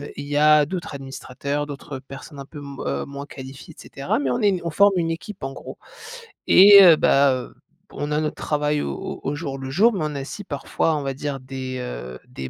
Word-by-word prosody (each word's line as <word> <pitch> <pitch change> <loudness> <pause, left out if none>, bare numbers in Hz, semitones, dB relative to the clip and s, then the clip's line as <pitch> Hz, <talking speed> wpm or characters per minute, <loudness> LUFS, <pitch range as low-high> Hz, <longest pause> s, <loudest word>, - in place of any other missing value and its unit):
il 145 - -7
y 145 0 -2
a 150 0 +5
d'autres 170 -2 -5
administrateurs, 140 +1 -5
d'autres 140 -1 -7
personnes 135 +2 -11
un 140 - -7
peu 145 +2 -11
m 140 -1 -9
heu, 70 0 -2
moins 140 0 -8
qualifiées 135 -1 -11
et - - -12
cetera. 140 0 -3
Mais 140 -2 -1
on 125 - -1
est 200 -3 +2
on 170 - -2
forme 200 +5 +4
une 165 -2 0
équipe, 185 +3 -7
en 135 0 -4
gros. - - -10 0.7
Et, 200 +1 +9
heu, 170 -3 +9
bah, 140 -1 +4
heu, 125 -1 -6 0.4
on 145 - -4
a 150 - +1
notre 155 - -2
travail 150 0 -1
au - - -3
au - - -6
au 145 - -2
jour 140 -3 -5
le 135 0 -6
jour, 215 - +4
mais 195 - -3
on 150 -1 -3
a 140 - -3
aussi 205 +9 -8
parfois 160 0 -1
on 145 - -4
va 135 -1 -2
dire 140 0 -4
des, 130 0 -6
heu, 65 - -7
des 65 0 -7
145 Hz, 235 wpm, -22 LUFS, 135-155 Hz, 0.7 s, Et